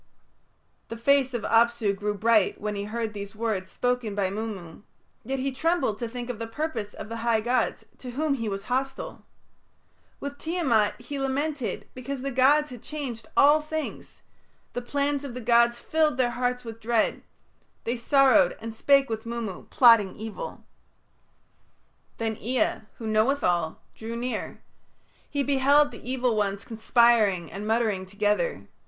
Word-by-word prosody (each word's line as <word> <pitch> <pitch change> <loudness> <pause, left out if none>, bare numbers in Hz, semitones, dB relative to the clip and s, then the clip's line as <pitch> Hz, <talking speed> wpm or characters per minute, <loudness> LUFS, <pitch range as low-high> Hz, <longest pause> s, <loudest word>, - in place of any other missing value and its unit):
The 230 - -6
face 265 +1 +3
of 230 - -3
Apsu 230 -2 +3
grew 205 +1 -2
bright 215 -1 +3
when 210 0 -3
he 200 0 -4
heard 225 0 -3
these 200 0 -7
words 215 -4 -2
spoken 245 -4 -1
by 195 -2 0
Mummu, 200 -6 -6 0.4
yet 270 +4 -2
he 270 +1 -1
trembled 270 -6 0
to 235 - -3
think 245 0 -6
of 245 -3 -5
the 230 - -4
purpose 225 -4 -4
of - - -7
the 230 +1 -5
high 230 -1 +2
gods, 245 +3 0
to 255 - -8
whom 290 +4 0
he 230 -5 -2
was 195 0 -4
hostile. 265 +3 -3 1.0
With 285 0 -6
Tiamat 280 -11 +1
he 285 -1 -6
lamented 275 0 -2
because 255 +1 -5
the 275 - -2
gods 275 +3 +4
had 245 -3 -9
changed 270 -7 -6
all 295 +2 +6
things; 310 0 -6 0.5
the 245 - -3
plans 285 +3 -1
of 265 -4 -6
the - - -4
gods 235 0 +4
filled 310 -2 +1
their 250 -2 +2
hearts 250 0 -1
with 225 -1 -8
dread; 225 0 +1 0.6
they 235 - -1
sorrowed 270 +2 +4
and 225 0 -6
spake 275 +4 +4
with 220 -1 -4
Mummu, 230 -5 -5
plotting 230 -6 +6
evil. 220 0 -7 1.5
Then 225 -1 -2
Ea, 245 +1 0 0.2
who 230 - -7
knoweth 220 +6 +2
all, 170 -3 0
drew 225 +1 -6
near; 245 +2 -4 0.7
he 285 -2 0
beheld 285 +1 +4
the 235 +1 -9
evil 250 -3 +1
ones 200 -1 -1
conspiring 220 -6 +3
and 205 +2 -6
muttering 220 -4 0
together. 210 - -1
235 Hz, 160 wpm, -26 LUFS, 215-270 Hz, 1.5 s, all